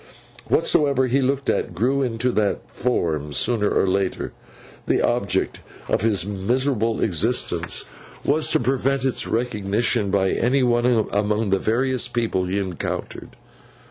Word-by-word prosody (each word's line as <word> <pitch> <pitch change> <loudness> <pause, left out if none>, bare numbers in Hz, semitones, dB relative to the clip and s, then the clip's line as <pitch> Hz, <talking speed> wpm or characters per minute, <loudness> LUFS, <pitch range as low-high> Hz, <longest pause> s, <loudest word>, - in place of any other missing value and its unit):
Whatsoever 140 -3 +3
he 130 +2 +1
looked 135 +1 -1
at, 90 - -1
grew 130 +8 +1
into 125 -1 0
that 105 -3 -1
form 80 - -1
sooner 105 +4 +1
or - - +2
later. 95 0 -1 0.5
The - - +2
object - - 0 0.3
of - - 0
his 100 -5 +1
miserable 115 +3 0
existence 90 -4 0 0.4
was 155 +3 +2
to - - +3
prevent 135 +2 0
its 130 - 0
recognition 110 -1 0
by 95 -1 +1
any 130 +3 +1
one 120 -2 +2
among 105 0 0
the 95 - +3
various 125 +3 +1
people 115 -6 -1
he 95 +2 -2
encountered. 95 -4 -5
115 Hz, 135 wpm, -22 LUFS, 100-125 Hz, 0.5 s, Whatsoever